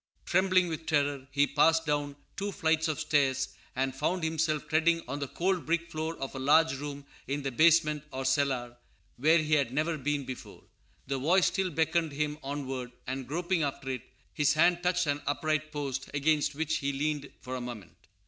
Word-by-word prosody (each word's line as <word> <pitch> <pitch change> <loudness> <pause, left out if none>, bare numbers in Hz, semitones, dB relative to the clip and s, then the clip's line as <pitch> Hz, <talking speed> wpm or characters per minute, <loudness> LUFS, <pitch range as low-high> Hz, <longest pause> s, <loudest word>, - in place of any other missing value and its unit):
Trembling 185 0 +3
with 160 -1 -5
terror, 145 -3 +1
he 140 +2 +3
passed 160 +3 +3
down 145 -1 -1 0.2
two 200 +1 -3
flights 160 -4 +1
of 155 -1 -2
stairs, 140 -4 +1 0.3
and 130 +1 0
found 160 +5 -1
himself 160 -1 0
treading 165 +1 +2
on 140 +3 -4
the 140 - -3
cold 185 +4 -1
brick 170 +1 0
floor 160 +1 -3
of 135 - -5
a 135 - -5
large 150 +3 +4
room 145 -1 -6 0.2
in 140 +1 -2
the 135 - -2
basement, 155 +1 +4
or 130 0 -4
cellar, 130 -3 0 0.4
where 155 +6 +5
he 155 -1 0
had 140 -5 +3
never 155 +3 0
been 145 0 -1
before. 130 -1 -9 0.4
The 135 0 -2
voice 175 +7 +4
still 190 -1 +1
beckoned 160 -1 0
him 150 +1 -2
onward; 135 -3 -4
and, 130 0 -4
groping 175 +3 0
after 140 -2 -2
it, 125 -3 -3 0.3
his 150 -2 +3
hand 175 +2 +4
touched 180 0 +1
an 145 0 -1
upright 155 +1 0
post, 140 -3 -4
against 150 0 +2
which 160 +1 0
he 140 0 -1
leaned 145 0 -2
for 130 0 -6
a 130 - -4
moment. 100 -9 -9
150 Hz, 185 wpm, -30 LUFS, 135-160 Hz, 0.4 s, where